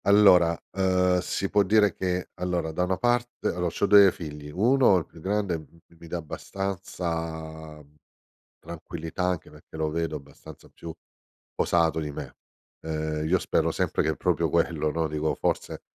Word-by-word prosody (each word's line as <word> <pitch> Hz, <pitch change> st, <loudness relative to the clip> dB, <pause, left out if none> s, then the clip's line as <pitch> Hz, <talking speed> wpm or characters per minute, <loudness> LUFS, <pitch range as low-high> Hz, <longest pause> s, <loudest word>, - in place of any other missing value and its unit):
Allora, 90 Hz, -5 st, +6 dB
ehm, 90 Hz, -1 st, +2 dB
si 95 Hz, +2 st, -2 dB
può 105 Hz, -, +4 dB
dire 105 Hz, +1 st, +4 dB
che, 90 Hz, -1 st, -2 dB
allora 90 Hz, -2 st, -1 dB
da 90 Hz, +3 st, -1 dB
una 95 Hz, 0 st, -1 dB
parte 120 Hz, 0 st, 0 dB
allo 90 Hz, 0 st, -1 dB
c'ho 85 Hz, -, 0 dB
2 100 Hz, -1 st, +7 dB
figli, 75 Hz, -4 st, -8 dB
1 115 Hz, -, +4 dB
il 85 Hz, -, -2 dB
più -, -, -16 dB
grande, 95 Hz, -2 st, -1 dB
m 80 Hz, +2 st, -17 dB, 0.2 s
mi 85 Hz, 0 st, -13 dB
dà 85 Hz, -, -3 dB
abbastanza, 80 Hz, -3 st, -5 dB
mhmm, 75 Hz, +1 st, -26 dB, 0.7 s
tranquillità 85 Hz, +1 st, -6 dB
anche 90 Hz, -2 st, -2 dB
perché -, -, -14 dB
lo 80 Hz, -1 st, -1 dB
vedo 80 Hz, 0 st, -2 dB
abbastanza 70 Hz, -2 st, -13 dB
più 85 Hz, -1 st, -9 dB, 0.6 s
posato 80 Hz, -1 st, +2 dB
di 75 Hz, -2 st, -4 dB
me. -, -, -8 dB, 0.5 s
Ehm, 80 Hz, -1 st, -3 dB
io 90 Hz, +3 st, +3 dB
spero -, -, 0 dB
sempre -, -, 0 dB
che 80 Hz, -, 0 dB
proprio -, -, 0 dB
quello, 75 Hz, -, +1 dB
no, 80 Hz, +1 st, -1 dB
dico, 75 Hz, 0 st, -1 dB
forse -, -, -2 dB
85 Hz, 160 wpm, -26 LUFS, 80-95 Hz, 0.7 s, 2